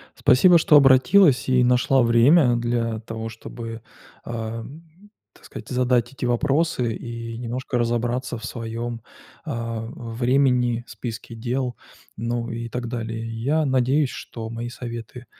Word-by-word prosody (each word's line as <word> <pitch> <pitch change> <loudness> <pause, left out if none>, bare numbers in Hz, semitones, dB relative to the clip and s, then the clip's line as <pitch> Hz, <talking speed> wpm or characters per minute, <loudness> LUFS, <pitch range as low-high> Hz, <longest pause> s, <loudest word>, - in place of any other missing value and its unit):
Спасибо, 175 +7 +5
что 155 -2 +4
обратилась 135 +2 +5
и 125 -1 +4
нашла 125 +2 +3
время 120 +3 +5
для 115 -1 -1
того, 115 0 -6
чтобы, 115 0 -8 0.4
эм, 135 - -8 0.2
так - - -20
сказать, - - -10
задать 125 -1 +1
эти 135 - -4
вопросы 130 -1 +1
и 115 -1 -7
немножко 125 +1 -3
разобраться 120 +1 -1
в - - -14
своём, 115 0 -5 0.4
а, 115 -5 -4
времени, 120 0 0
списке 115 -1 -7
дел, 125 +1 -2 0.4
ну 115 +1 -2
и 115 0 -5
так 120 +1 -4
далее. 115 -1 -4 0.2
Я 155 +4 +2
надеюсь, 130 +1 +2
что 115 -1 -7
мои 115 +1 -5
советы 120 0 -8
120 Hz, 130 wpm, -23 LUFS, 115-130 Hz, 0.4 s, Спасибо